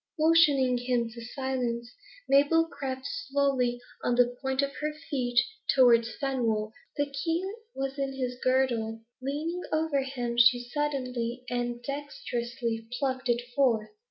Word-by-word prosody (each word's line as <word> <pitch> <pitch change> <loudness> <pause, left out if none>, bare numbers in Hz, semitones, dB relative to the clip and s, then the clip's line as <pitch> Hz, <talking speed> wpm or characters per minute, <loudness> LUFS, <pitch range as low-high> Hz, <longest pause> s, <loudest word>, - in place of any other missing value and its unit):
Motioning 300 -6 +5
him 245 -2 0
to 235 +1 -9
silence, 245 -2 -3 0.3
Mabel 290 +4 +5
crept 265 -4 -5
slowly, 270 -4 0 0.2
and 245 0 +1
on 245 - +8
the 245 0 -8
points 265 0 +1
of 280 - -1
her 300 0 -1
feet, 255 -5 0 0.4
towards 235 -3 +5
Fenwolf. 230 -6 0 0.3
The 290 - +2
key 330 +6 -1 0.3
was 270 +1 -3
in 275 -1 -1
his 250 -2 -3
girdle. 240 -4 +1 0.2
Leaning 305 +6 -2
over 310 -3 +1
him, 245 -3 -3
she 240 +1 +7
suddenly 255 -4 -2
and 240 0 -2
dexterously 240 -5 -4
plucked 260 -1 -1
it 240 0 +2
forth. 235 -6 +2
260 Hz, 135 wpm, -29 LUFS, 240-280 Hz, 0.4 s, on